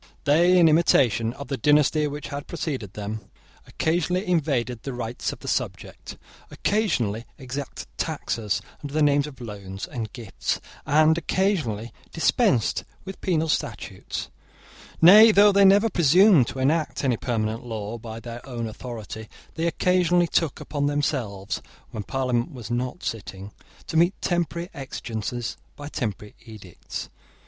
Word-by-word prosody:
They, 170 Hz, +5 st, +5 dB
in 170 Hz, -2 st, +7 dB
imitation 130 Hz, -8 st, +3 dB
of 140 Hz, 0 st, -9 dB
the 135 Hz, 0 st, -2 dB
dynasty 150 Hz, +3 st, +3 dB
which 145 Hz, +1 st, -6 dB
had 140 Hz, 0 st, -6 dB
preceded 135 Hz, -, -4 dB
them, 105 Hz, +1 st, -5 dB, 0.5 s
occasionally 175 Hz, +4 st, 0 dB
invaded 135 Hz, -9 st, 0 dB
the 135 Hz, -, -5 dB
rights 120 Hz, 0 st, -3 dB
of -, -, -10 dB
the -, -, -9 dB
subject, -, -, -4 dB, 0.3 s
occasionally 125 Hz, -, 0 dB
exacted 135 Hz, +1 st, -6 dB
taxes 105 Hz, -3 st, -2 dB, 0.2 s
under 145 Hz, 0 st, -7 dB
the 155 Hz, -, +3 dB
name 145 Hz, -1 st, +4 dB
of 135 Hz, -3 st, -11 dB
loans 100 Hz, -4 st, -7 dB
and 110 Hz, -4 st, -5 dB
gifts, 115 Hz, -6 st, -3 dB, 0.3 s
and 155 Hz, +3 st, +4 dB
occasionally 155 Hz, -, -1 dB, 0.2 s
dispensed 165 Hz, -, +2 dB, 0.2 s
with 190 Hz, 0 st, -8 dB
penal 160 Hz, -3 st, +1 dB
statutes: 155 Hz, -, -3 dB, 0.7 s
nay, 215 Hz, +6 st, +10 dB
though 205 Hz, 0 st, +6 dB
they 200 Hz, 0 st, +5 dB
never 200 Hz, +3 st, +6 dB
presumed 175 Hz, -, +5 dB
to -, -, -6 dB
enact 150 Hz, +5 st, 0 dB
any 130 Hz, -3 st, +2 dB
permanent 115 Hz, 0 st, -2 dB
law 110 Hz, -1 st, -5 dB
by 110 Hz, 0 st, -7 dB
their 120 Hz, +1 st, -8 dB
own 120 Hz, -3 st, -5 dB
authority, 110 Hz, -1 st, -7 dB, 0.2 s
they 165 Hz, +1 st, -1 dB
occasionally 175 Hz, +1 st, +3 dB
took 165 Hz, -2 st, 0 dB
upon 145 Hz, -1 st, -2 dB
themselves, 125 Hz, -9 st, -2 dB, 0.3 s
when 110 Hz, -, -4 dB
Parliament 125 Hz, -, -1 dB
was 120 Hz, -5 st, -8 dB
not 125 Hz, +7 st, -2 dB
sitting, 100 Hz, -5 st, -5 dB, 0.3 s
to 160 Hz, -, -2 dB
meet 175 Hz, +4 st, +3 dB
temporary 175 Hz, +1 st, -1 dB
exigencies 120 Hz, -3 st, -5 dB, 0.2 s
by 145 Hz, -, -8 dB
temporary 105 Hz, -7 st, -4 dB
edicts. 105 Hz, -7 st, -8 dB
135 Hz, 140 wpm, -25 LUFS, 115-165 Hz, 0.7 s, nay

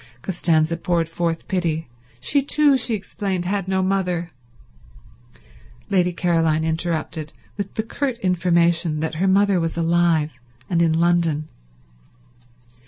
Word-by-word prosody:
Costanza 165 Hz, -2 st, +1 dB
poured 170 Hz, -1 st, 0 dB
forth 165 Hz, 0 st, -3 dB
pity. 165 Hz, -4 st, -1 dB, 0.3 s
She 280 Hz, -, +3 dB
too, 290 Hz, 0 st, +4 dB
she 245 Hz, -3 st, +2 dB
explained, 195 Hz, -2 st, -3 dB
had 195 Hz, 0 st, -2 dB
no 190 Hz, 0 st, +1 dB
mother— 180 Hz, -3 st, -1 dB, 1.6 s
Lady 180 Hz, -2 st, +3 dB
Caroline 165 Hz, -3 st, +1 dB
interrupted 160 Hz, -1 st, -2 dB, 0.2 s
with 200 Hz, -1 st, -5 dB
the 220 Hz, -, -1 dB
curt 255 Hz, +2 st, -3 dB
information 170 Hz, -4 st, +1 dB
that 160 Hz, 0 st, -2 dB
her 195 Hz, -, +3 dB
mother 195 Hz, 0 st, +3 dB
was 165 Hz, 0 st, -2 dB
alive 165 Hz, -2 st, +2 dB, 0.4 s
and 170 Hz, -1 st, +1 dB
in 165 Hz, -2 st, +3 dB
London. 165 Hz, -2 st, +1 dB
175 Hz, 120 wpm, -21 LUFS, 165-190 Hz, 1.6 s, too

